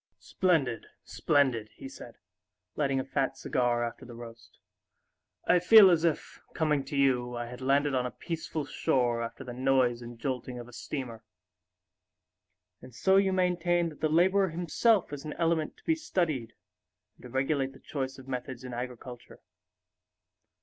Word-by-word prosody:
"Splendid, 160 - 0 0.2
splendid!" 130 -7 +1
he - - -9
said, - - -11 0.6
lighting 135 -3 0
a 130 - -3
fat 135 0 -1
cigar 120 -1 0
after 120 0 -5
the 120 -2 -10
roast. 115 -2 -12 0.9
"I 180 - +4
feel 195 +1 +8
as 170 -2 +2
if, 165 -3 -1
coming 150 -3 +1
to 140 +1 -4
you, 125 -3 +2
I 120 - -3
had 125 +2 -9
landed 140 +2 +2
on 125 -1 +1
a - - -11
peaceful 160 -2 -4
shore 120 -4 0
after 115 - -6
the 125 - -7
noise 130 -1 +2
and 120 0 -9
jolting 125 0 -4
of 120 -1 -8
a 125 - -15
steamer. 120 -4 -6 1.6
And 125 -1 -13
so 190 +10 +3
you 195 -1 +3
maintain 175 -2 +1
that 150 - -14
the 155 - +2
laborer 190 +4 +3
himself 175 +3 +1
is 145 - -6
an 150 - -5
element 165 -2 0
to - - -23
be 325 - +2
studied 160 - -2 0.6
and - - -21
to - - -9
regulate 135 +1 0
the - - -15
choice 135 -2 -4
of 130 -1 -13
methods 130 -1 -5
in 125 -1 -7
agriculture. 125 0 -8
135 Hz, 165 wpm, -29 LUFS, 125-160 Hz, 1.6 s, feel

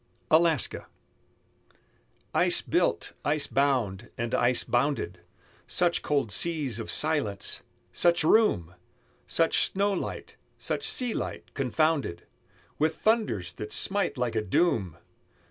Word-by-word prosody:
ALASKA 160 -4 +2 1.5
Ice - - +3
built, - - 0
ice 145 0 +1
bound, 120 -7 0
and 115 0 -3
ice 120 0 +2
bounded, 140 +4 -1 0.5
Such 175 -1 +1
cold 140 -7 0
seas 145 - -1
of 115 - -6
silence! 145 -11 0 0.3
such 170 -2 +3
room! 155 - +3 0.5
Such 165 -1 +2
snow 200 +1 +1
light, 190 - -5 0.2
such - - -2
sea 250 -3 +3
light, - - -5
confounded 140 - 0 0.5
With 155 +1 +1
thunders 160 - 0
that 105 - -7
smite 200 -6 +1
like 125 -2 -1
a 110 - 0
doom! 105 - 0
145 Hz, 110 wpm, -27 LUFS, 115-170 Hz, 1.5 s, Ice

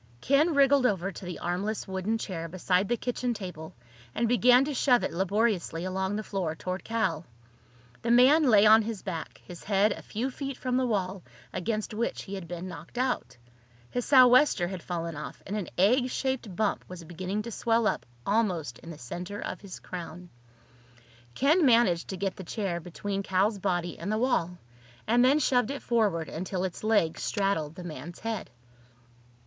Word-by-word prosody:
Ken 295 - +3
wriggled 275 -2 +5
over 195 -2 -1
to 190 - -10
the 180 -1 -5
armless 195 +6 -3
wooden 190 +4 -1
chair 170 -6 -5
beside 185 +2 0
the 240 - +1
kitchen 245 0 -2
table 180 -6 -8 0.4
and 235 - +1
began 245 +2 +5
to 295 - -3
shove 250 -2 +3
it - - -2
laboriously 190 -2 0
along 190 +1 -2
the 215 - -3
floor 185 -7 -3
toward 185 +3 -4
Cal. 190 -8 -1 0.8
The 230 - -3
man 255 +6 +6
lay 210 -2 +6
on 220 +1 +8
his 220 -2 -5
back, 170 -5 -5
his 175 -2 -10
head 205 +1 +3
a - - -5
few 245 +5 -3
feet 275 0 -5
from 255 -1 -2
the 255 0 +2
wall 195 -4 -1 0.3
against 215 +4 -2
which 230 +3 -2
he 195 - -8
had 190 -4 -6
been 175 +2 -6
knocked 165 +5 -10
out. 255 - -1 0.5
His 245 - -1
sou'wester 255 -7 +6
had 185 -2 -6
fallen 170 -2 -4
off, 150 - -8
and 200 - -4
an 205 -4 -3
egg 245 +7 +4
shaped 260 -8 -2
bump 215 0 0
was 180 -2 -9
beginning 185 +5 -4
to 235 - -6
swell 230 +1 +1
up - - 0 0.2
almost 180 - 0
in 165 - -12
the 165 - -8
center 180 +11 -6
of - - -5
his 195 -3 -9
crown. 175 0 -8 1.0
Ken 310 +6 +3
managed 230 - +4
to 190 - -5
get 195 0 -2
the 190 - -7
chair 185 -2 -3
between 195 +4 -4
Cal's 195 +2 +1
body 175 -3 -2
and 180 +5 -3
the 215 - +1
wall, 200 -8 0 0.5
and 240 +2 +4
then 265 +4 +5
shoved 250 -6 +2
it 280 0 -5
forward 205 -9 +1
until 185 +3 -3
its 185 +1 -4
legs 205 -7 +2
straddled 180 -7 -1
the 180 - -8
man's 165 0 -8
head. 225 -3 -4
200 Hz, 185 wpm, -28 LUFS, 180-235 Hz, 1.0 s, on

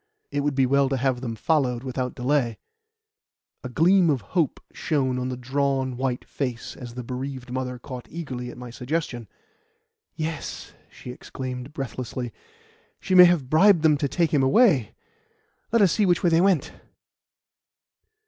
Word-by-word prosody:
"It 145 - -1
would 145 -1 0
be 135 -1 +3
well 140 +1 +3
to 135 - 0
have 130 -1 0
them 115 -3 -4
followed 125 0 0
without 130 -1 -3
delay." 125 -3 0 1.1
A 125 - -5
gleam 175 +6 +4
of 135 -5 +1
hope 170 -6 +1
shone 130 -5 0
on 125 0 -2
the 125 - -4
drawn, 135 0 -1
white 130 -1 -2
face 125 -5 -4
as 120 -2 -9
the 125 - -5
bereaved 130 0 -6
mother 125 0 -3
caught 125 -1 -9
eagerly 130 -7 -6
at - - -10
my 125 -1 -8
suggestion. 125 -2 -3 0.9
"Yes," 160 0 -5 0.2
she 125 - -10
exclaimed 125 +1 -7
breathlessly; 125 -3 -5 0.7
"she 190 - -3
may 180 -1 +10
have 170 -7 +2
bribed 170 +3 +5
them 155 -2 +5
to 140 - 0
take 165 +2 0
him 145 - +4
away. 135 - +3 0.8
Let 230 -2 +4
us 185 - +4
see 210 -3 +2
which 175 - +2
way 175 - +3
they 165 +1 +4
went." 190 -5 +2
135 Hz, 160 wpm, -25 LUFS, 125-155 Hz, 1.1 s, may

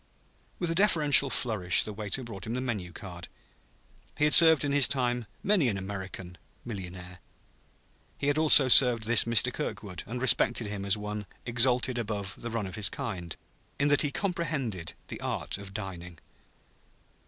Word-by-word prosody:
With 175 -2 -2
a - - +2
deferential 155 -7 +3
flourish 105 -10 +1
the 105 - -8
waiter 105 +5 -5
brought 110 -4 -9
him 115 - -4
the - - -3
menu 110 -9 -5
card. 85 -2 -10 0.9
He - - -1
had 150 - +2
served 160 -4 +8
in 145 - -2
his 140 -2 +4
time 125 -3 -2 0.2
many 195 -9 +1
an 100 - -3
"American, 95 -2 -8 0.3
millionaire"; 90 -5 -9 1.0
he - - -5
had 145 +2 0
also 150 -3 +7
served 125 -3 +6
this 115 +1 +5
Mr. 115 -2 +1
Kirkwood, 90 -4 -6
and 120 +3 -6
respected 120 -1 +2
him 100 -1 -6
as 100 +1 +1
one 105 -1 -7 0.2
exalted 125 +1 +1
above 105 -4 -5
the 120 - -6
run 115 -3 -4
of 95 - -9
his 105 -3 +1
kind, 90 -7 -7 0.4
in 145 +1 +1
that 145 - +3
he 145 - -1
comprehended 140 - -4
the - - -8
art - - -4
of 100 -1 -11
dining. 90 -4 -8
115 Hz, 165 wpm, -27 LUFS, 95-135 Hz, 1.0 s, served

